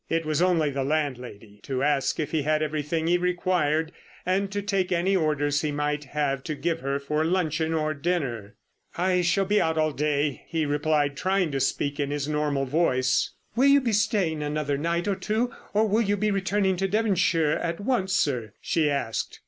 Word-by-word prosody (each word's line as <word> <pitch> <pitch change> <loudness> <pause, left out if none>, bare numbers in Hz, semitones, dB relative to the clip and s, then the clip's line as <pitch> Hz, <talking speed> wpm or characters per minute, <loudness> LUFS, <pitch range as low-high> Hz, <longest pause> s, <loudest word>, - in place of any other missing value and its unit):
It 165 0 0
was 155 +1 0
only 170 -5 +2
the 135 0 -2
landlady 125 -8 -3
to 130 +2 -3
ask 145 -2 +1
if 150 - -2
he 160 - +1
had 155 +2 +1
everything 155 +1 -2
he 175 +1 +3
required 175 -3 0 0.3
and 195 +2 0
to 205 - -2
take 195 -2 0
any 180 +3 +2
orders 145 -4 +1
he 150 - -1
might 150 0 -2
have 140 -1 -2
to 155 - -3
give 165 +2 -1
her 140 -1 -1
for 150 +2 -1
luncheon 160 -2 0
or 155 -1 0
dinner. 140 - -2 0.4
"I 180 +1 +2
shall 180 +3 +2
be 205 +2 +2
out 160 0 0
all 155 0 +2
day," 145 -1 -1
he 160 -2 -1
replied, 145 -1 +1
trying 185 +1 0
to 135 - -1
speak 145 +2 -1
in 140 -1 0
his 145 -1 -2
normal 150 -2 0
voice. 130 -3 +1 0.2
"Will 260 +4 +4
you 280 0 +6
be 240 -5 -1
staying 200 -7 +1
another 150 -1 -1
night 170 +5 -1
or 200 - +1
two, 220 +5 -1 0.2
or 215 +1 +2
will 215 +3 +2
you 205 -2 +1
be 210 +1 +1
returning 195 -1 +1
to 195 +2 0
Devonshire 185 -7 +2
at 170 0 -2
once, 205 -3 0
sir?" 125 - 0
she 155 -3 +1
asked. 140 -6 -2
155 Hz, 195 wpm, -26 LUFS, 145-185 Hz, 0.4 s, you